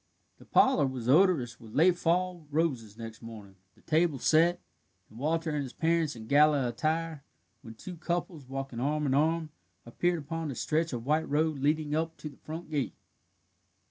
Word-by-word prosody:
The - - -15
parlour 160 - +4
was 130 -3 -5
odorous 140 -6 +3
with 110 -2 -13
late 175 +4 +5
fall 175 -1 0
roses 135 -9 -1
next 115 -1 -8
morning, 110 -4 -10 0.2
the - - -24
table 160 -2 +1
set, 170 +6 +3 0.5
and 110 - -12
Walter 160 +3 0
and 150 -1 -1
his 130 -3 -6
parents 165 -3 +1
in 110 -1 -9
gala 145 0 +4
attire, 155 +3 -2 0.4
when 115 -4 -11
two 180 +9 -9
couples, 170 -5 -3
walking 135 -3 -5
arm 150 +3 0
in 135 - +1
arm, 160 +2 +1 0.3
appeared 175 +9 0
upon 165 +1 -4
the 140 - -4
stretch 160 +5 0
of 120 -2 -5
white 155 +3 +1
road 155 0 +1
leading 150 +1 0
up 160 +1 -1
to 155 - -7
the 140 - -16
front 160 +1 -8
gate. 145 -3 -2
150 Hz, 175 wpm, -29 LUFS, 130-165 Hz, 0.5 s, late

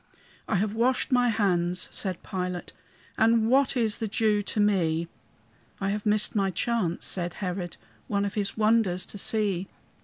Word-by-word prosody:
"I 220 - 0
have 205 +2 0
washed 250 +5 +1
my 245 -1 +4
hands," 180 -4 0
said 185 -4 -3
Pilate, 180 -1 -4 0.5
"And 225 0 +4
what 270 0 +3
is 225 -3 +1
the 225 - -1
Jew 210 0 +1
to 205 - -3
me?" 170 -5 +2 0.7
"I 195 0 0
have 210 +1 -3
missed 210 0 +2
my 195 -2 +2
chance," 190 -2 -1
said 175 -2 -2
Herod, 180 -2 -4 0.3
"One 200 -1 0
of 200 - -3
his 205 0 -2
wonders 215 -4 +2
to 205 - -8
see. 195 -4 0
205 Hz, 160 wpm, -27 LUFS, 180-220 Hz, 0.7 s, my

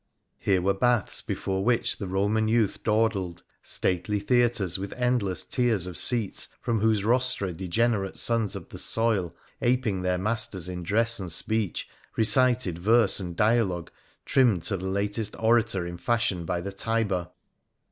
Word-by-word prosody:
Here 95 -3 +1
were 100 +1 +2
baths 120 +2 +1
before 95 0 -3
which 120 +1 0
the 100 - -4
Roman 100 +4 0
youth 110 -2 +1
dawdled; 105 -6 0 0.2
stately 95 +3 -1
theatres 110 -4 +1
with 100 0 -5
endless 120 -7 -1
tiers 120 -8 +1
of 90 -1 -7
seats, 115 -6 +3
from 115 -2 -1
whose 110 -1 +1
rostra 125 -4 +1
degenerate 95 +3 -1
sons 115 -3 0
of - - -8
the - - -6
soil, 110 -7 0 0.3
aping 120 -6 0
their 90 0 0
masters 105 -2 -1
in 90 -1 -5
dress 110 +6 +2
and 90 -3 -5
speech, 105 +2 -1 0.3
recited 115 -5 +3
verse 110 +2 +3
and 90 -3 -6
dialogue 105 -5 +1 0.3
trimmed 115 -11 +2
to 95 +2 0
the 95 - -7
latest 100 +3 -2
orator 110 -5 +2
in 85 0 -6
fashion 115 -7 0
by 85 +1 -2
the 100 +2 -5
Tiber. 100 -4 -1
105 Hz, 150 wpm, -26 LUFS, 95-115 Hz, 0.3 s, seats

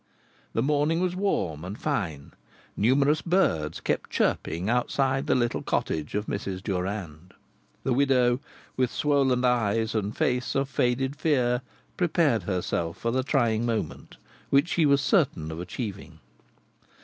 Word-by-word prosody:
The 115 - +1
morning 150 +3 +2
was 180 0 0
warm 90 - -1
and 95 +4 -6
fine; 80 -8 -3 0.4
numerous 140 +7 +3
birds 85 - +1
kept - - -2
chirping 85 +4 0
outside 130 +3 +1
the - - +3
little 120 -2 0
cottage 75 +1 -2
of 105 +1 -1
Mrs. 95 -3 -4
Durand. 90 -3 -4 0.5
The 130 - +1
widow, 125 -2 +3 0.4
with 130 -2 +1
swollen 135 -4 +2
eyes 115 -2 +1
and 105 -1 -2
face 125 -2 0
of 135 0 0
faded 130 +1 0
fear, 125 -5 +1 0.4
prepared 165 - +2
herself 85 -2 -2
for 115 - -1
the 130 +2 +1
trying 120 -5 +1
moment, 115 -2 -3 0.3
which 140 +5 +3
she 165 -4 +3
was 140 -1 +4
certain 80 - +1
of 80 - -6
achieving. 100 +3 -6
120 Hz, 135 wpm, -26 LUFS, 100-140 Hz, 0.5 s, was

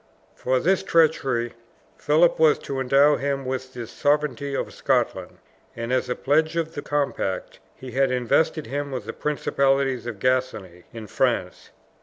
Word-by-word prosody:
For 130 0 0
this 190 +7 +2
treachery, 135 -8 +1 0.4
Philip 160 +3 +3
was 155 -2 +5
to 135 -1 -5
endow 140 +3 +4
him 140 -1 -2
with 130 0 -4
the 120 -1 -5
sovereignty 145 +1 -1
of - - -3
Scotland; - - -1 0.4
and, 115 +2 -3
as 130 - 0
a 125 - -1
pledge 155 +4 +1
of 165 -1 -2
the 145 - -5
compact, 140 -11 -2 0.2
he 130 -1 -10
had 135 +2 +2
invested 145 +6 +1
him 145 +1 -4
with 130 -2 -5
the - - -6
principality 140 -2 +1 0.2
of 115 - -7
Gascony 115 -8 -1
in 115 -2 -8
France. 105 - -1
135 Hz, 155 wpm, -24 LUFS, 125-150 Hz, 0.4 s, was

